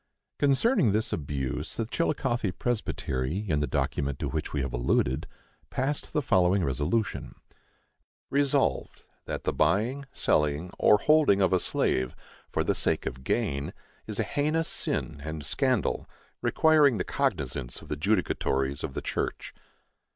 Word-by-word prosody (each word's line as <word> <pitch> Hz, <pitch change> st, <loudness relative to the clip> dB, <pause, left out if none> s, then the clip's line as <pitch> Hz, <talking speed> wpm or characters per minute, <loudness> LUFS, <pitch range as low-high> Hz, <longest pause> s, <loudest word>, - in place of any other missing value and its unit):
Concerning 140 Hz, -, +3 dB
this 110 Hz, +1 st, 0 dB
abuse 70 Hz, -4 st, -3 dB
the 115 Hz, -, 0 dB
Chillicothe 120 Hz, -, -1 dB
Presbytery, 95 Hz, -, -2 dB
in 75 Hz, -5 st, +1 dB
the 75 Hz, -, 0 dB
document 70 Hz, -1 st, -1 dB
to -, -, -3 dB
which 80 Hz, 0 st, -3 dB
we 75 Hz, -, -1 dB
have 70 Hz, -, -4 dB
alluded, 60 Hz, +2 st, +1 dB, 0.4 s
passed 140 Hz, +3 st, -2 dB
the 150 Hz, -, 0 dB
following 95 Hz, -3 st, +3 dB
resolution: 75 Hz, -, -1 dB, 1.0 s
Resolved, 140 Hz, -, +1 dB, 0.2 s
That -, -, -4 dB
the -, -, 0 dB
buying, 110 Hz, -, +1 dB
selling, 75 Hz, +4 st, +1 dB
or 105 Hz, -, +6 dB
holding 150 Hz, -4 st, +4 dB
of 95 Hz, -1 st, +3 dB
a 90 Hz, -, +4 dB
slave, 65 Hz, -6 st, 0 dB, 0.3 s
for -, -, 0 dB
the -, -, +1 dB
sake -, -, 0 dB
of 65 Hz, +1 st, -5 dB
gain, 70 Hz, +1 st, -1 dB, 0.3 s
is -, -, -4 dB
a -, -, +3 dB
heinous 155 Hz, +2 st, 0 dB
sin 70 Hz, -, -2 dB
and 80 Hz, -1 st, -5 dB
scandal, 130 Hz, -, 0 dB, 0.3 s
requiring 150 Hz, -6 st, +4 dB
the 90 Hz, -, 0 dB
cognizance 70 Hz, -, -1 dB
of -, -, -13 dB
the -, -, -2 dB
judicatories 75 Hz, -6 st, 0 dB
of 65 Hz, -, -4 dB
the -, -, -3 dB
church. -, -, -3 dB
90 Hz, 145 wpm, -28 LUFS, -, 1.0 s, or